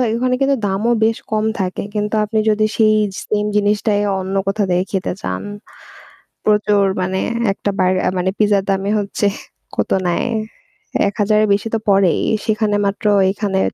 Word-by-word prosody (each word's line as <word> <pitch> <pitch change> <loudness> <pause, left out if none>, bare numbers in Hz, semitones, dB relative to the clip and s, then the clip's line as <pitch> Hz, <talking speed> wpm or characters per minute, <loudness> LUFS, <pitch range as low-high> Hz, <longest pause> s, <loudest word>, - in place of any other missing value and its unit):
ওখানে 255 +1 +1
কিন্তু 275 0 +3
দামও 205 +5 0
বেশ 225 0 +1
কম 215 0 +1
থাকে। 185 -1 -2
কিন্তু 210 +1 -1
আপনি 215 +1 -1
যদি 215 0 +2
সেই 215 -1 +4 0.3
সেইম 210 0 -1
জিনিসটাই 205 0 +1 0.2
অন্য 190 +1 -4
কোথাও 200 +1 +1
থেকে 180 +1 +2
খেতে 190 -2 -1
চান - - -3 1.0
প্রচুর 210 -1 +3 0.2
মানে 190 +1 -1 0.3
একটা 205 - -3
বার, 185 0 +3 0.3
মানে 185 +1 0
পিজ্জার 205 -2 +2
দামে 195 +1 0
হচ্ছে 205 0 -1 0.5
কত - - -1 0.2
নেয়? 175 +7 0 0.8
৳১,০০০ 210 +1 +1
এর - - +2
বেশি 205 +3 -1
তো 225 - 0
পড়েই। 195 -4 +3 0.2
সেখানে 215 -1 +1
মাত্র 200 +2 -3 0.2
এইখানে 195 -1 -1
205 Hz, 155 wpm, -18 LUFS, 195-215 Hz, 1.0 s, সেই